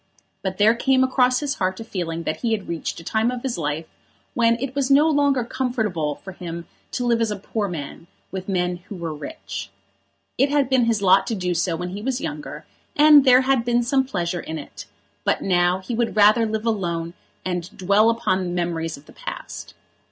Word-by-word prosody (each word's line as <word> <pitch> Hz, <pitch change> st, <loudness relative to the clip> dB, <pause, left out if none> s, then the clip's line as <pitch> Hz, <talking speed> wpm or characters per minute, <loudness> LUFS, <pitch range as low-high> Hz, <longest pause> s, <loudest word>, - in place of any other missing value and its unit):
But 190 Hz, -1 st, -3 dB
there 215 Hz, +2 st, +5 dB
came 260 Hz, +2 st, +2 dB
across 255 Hz, 0 st, +2 dB
his 290 Hz, -1 st, -1 dB
heart 185 Hz, 0 st, 0 dB
a -, -, -5 dB
feeling 170 Hz, -6 st, -4 dB
that 155 Hz, -, -2 dB
he 230 Hz, -2 st, 0 dB
had 205 Hz, -3 st, -3 dB
reached 170 Hz, 0 st, -4 dB
a -, -, -11 dB
time 220 Hz, +6 st, +1 dB
of 250 Hz, -1 st, -4 dB
life 150 Hz, +2 st, -2 dB, 0.5 s
in 230 Hz, -1 st, +4 dB
which -, -, -9 dB
it 260 Hz, +1 st, -3 dB
was 275 Hz, -1 st, 0 dB
no 285 Hz, +3 st, +6 dB
longer 285 Hz, -4 st, +2 dB
comfortable 220 Hz, -, -1 dB
for 190 Hz, -, -10 dB
him 170 Hz, -2 st, -7 dB, 0.3 s
to 245 Hz, -, -1 dB
live 235 Hz, -1 st, +2 dB
as 225 Hz, -, +1 dB
a 210 Hz, -, -2 dB
poor 205 Hz, +1 st, -3 dB
man 165 Hz, -1 st, -7 dB, 0.2 s
with 190 Hz, 0 st, -5 dB
men 180 Hz, -2 st, 0 dB
who 205 Hz, -, -6 dB
were 170 Hz, -3 st, -4 dB
rich. 145 Hz, -8 st, -7 dB, 0.7 s
It 275 Hz, +2 st, +4 dB
had 280 Hz, -2 st, +1 dB
been 255 Hz, -3 st, +4 dB
his 225 Hz, -3 st, +1 dB
lot 190 Hz, +1 st, +5 dB
to 225 Hz, -, -1 dB
do 180 Hz, -2 st, -1 dB
so 170 Hz, 0 st, 0 dB
when 180 Hz, +2 st, -4 dB
he 200 Hz, +3 st, -6 dB
was 255 Hz, +2 st, -1 dB
younger, 150 Hz, -, -6 dB, 0.3 s
and 295 Hz, -1 st, +7 dB
there 255 Hz, 0 st, +7 dB
had 265 Hz, -2 st, +2 dB
been 240 Hz, 0 st, +2 dB
some 265 Hz, +3 st, +2 dB
pleasure 175 Hz, -9 st, -2 dB
in 160 Hz, -, -5 dB
it; 145 Hz, -, -9 dB, 0.4 s
but -, -, 0 dB
now 180 Hz, 0 st, +2 dB
he 235 Hz, -, -5 dB
would 235 Hz, -1 st, -1 dB
rather 215 Hz, +2 st, +5 dB
live 220 Hz, +1 st, -3 dB
alone 170 Hz, -6 st, -1 dB, 0.3 s
and 180 Hz, -1 st, -2 dB
dwell 200 Hz, +4 st, +4 dB
upon 210 Hz, -5 st, +1 dB
the 180 Hz, -, -3 dB
memories 170 Hz, -2 st, -2 dB
of 140 Hz, -, -17 dB
the -, -, -16 dB
past. -, -, -8 dB
205 Hz, 210 wpm, -23 LUFS, 175-245 Hz, 0.7 s, and